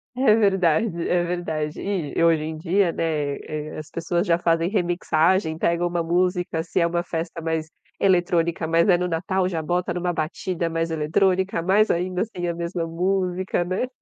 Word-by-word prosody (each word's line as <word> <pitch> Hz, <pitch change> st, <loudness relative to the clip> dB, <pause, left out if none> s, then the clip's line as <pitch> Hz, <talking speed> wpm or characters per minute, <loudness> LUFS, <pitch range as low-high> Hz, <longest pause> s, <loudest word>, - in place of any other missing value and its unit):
É 250 Hz, -4 st, +4 dB
verdade, 195 Hz, -1 st, +3 dB, 0.2 s
é 175 Hz, -1 st, +2 dB
verdade. 160 Hz, -3 st, -3 dB
E 185 Hz, -8 st, -3 dB
e -, -, +3 dB
hoje 165 Hz, -2 st, +4 dB
em 155 Hz, 0 st, -5 dB
dia, 180 Hz, +3 st, +1 dB
né, 150 Hz, -4 st, -1 dB
eh, 155 Hz, 0 st, -5 dB
as 155 Hz, -, -8 dB
pessoas 170 Hz, +3 st, -1 dB
já 170 Hz, -1 st, +3 dB
fazem 165 Hz, 0 st, +1 dB
remixagem. 175 Hz, -3 st, +1 dB
Pega 170 Hz, +1 st, +1 dB
uma 175 Hz, -1 st, -1 dB
música, 180 Hz, 0 st, 0 dB
se 175 Hz, -, -1 dB
é 170 Hz, -, +3 dB
uma 170 Hz, 0 st, 0 dB
festa 165 Hz, 0 st, -4 dB
mais 160 Hz, -1 st, -2 dB, 0.3 s
eletrônica 175 Hz, -3 st, +1 dB
mas 165 Hz, +4 st, +3 dB
é 180 Hz, -, +6 dB
no 180 Hz, +1 st, -1 dB
Natal, 180 Hz, +2 st, 0 dB
já 170 Hz, -3 st, -2 dB
bota 175 Hz, +3 st, -1 dB
numa 180 Hz, 0 st, -1 dB
batida 165 Hz, +1 st, -2 dB
mais 165 Hz, 0 st, -1 dB
eletrônica, 180 Hz, +4 st, +1 dB
mas 195 Hz, +5 st, +3 dB
ainda 180 Hz, +1 st, 0 dB
assim 195 Hz, -6 st, -5 dB
é -, -, 0 dB
a -, -, -1 dB
mesma 170 Hz, 0 st, -3 dB
música 185 Hz, +1 st, -1 dB
né. 185 Hz, +8 st, -2 dB
175 Hz, 185 wpm, -23 LUFS, 165-185 Hz, 0.3 s, é